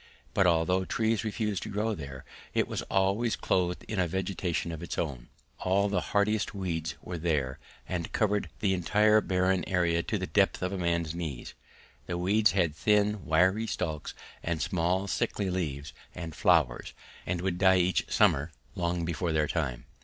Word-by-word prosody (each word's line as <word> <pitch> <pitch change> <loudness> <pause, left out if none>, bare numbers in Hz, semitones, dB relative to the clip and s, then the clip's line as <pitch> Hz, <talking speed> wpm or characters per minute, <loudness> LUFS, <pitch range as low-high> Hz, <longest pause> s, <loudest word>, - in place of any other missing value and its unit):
But 95 - +4
although 85 +2 +2
trees 110 +3 0
refused 105 -3 -2
to - - -5
grow 105 +2 -1
there 70 -6 -8 0.3
it - - +2
was - - -3
always 100 +5 +2
clothed 90 -1 0
in 105 - -2
a 90 - +2
vegetation 90 -1 -2
of 80 - -6
its 85 - -5
own; 65 -7 -3 0.3
all 100 +2 +2
the 100 - +1
hardiest 105 0 0
weeds 80 -6 -3
were 90 -2 -5
there, 75 -6 -1 0.3
and 85 -2 -3
covered 105 -2 +1
the 100 -2 +2
entire 105 +4 +4
barren 95 -1 +1
area 85 -2 +2
to - - -2
the - - -2
depth - - +2
of 90 - -1
a - - -2
man's 85 -2 0
knees. 80 -8 -5 0.5
These 90 - -2
weeds 100 +5 +3
had 85 -6 +1
thin 105 +1 +2
wiry 95 +7 +3
stalks 80 -6 -3 0.3
and 85 -1 -2
small 90 +3 0
sickly 95 +1 -1
leaves 75 -5 -3 0.2
and 85 -3 -6
flowers, 80 -8 +2 0.3
and 90 0 -1
would 90 -1 -1
die 95 -1 +6
each 90 0 +1
summer 75 +4 +3 0.2
long 85 -1 -1
before 85 +1 -1
their 75 -1 +2
time. 70 -8 -2
90 Hz, 170 wpm, -29 LUFS, 80-100 Hz, 0.5 s, die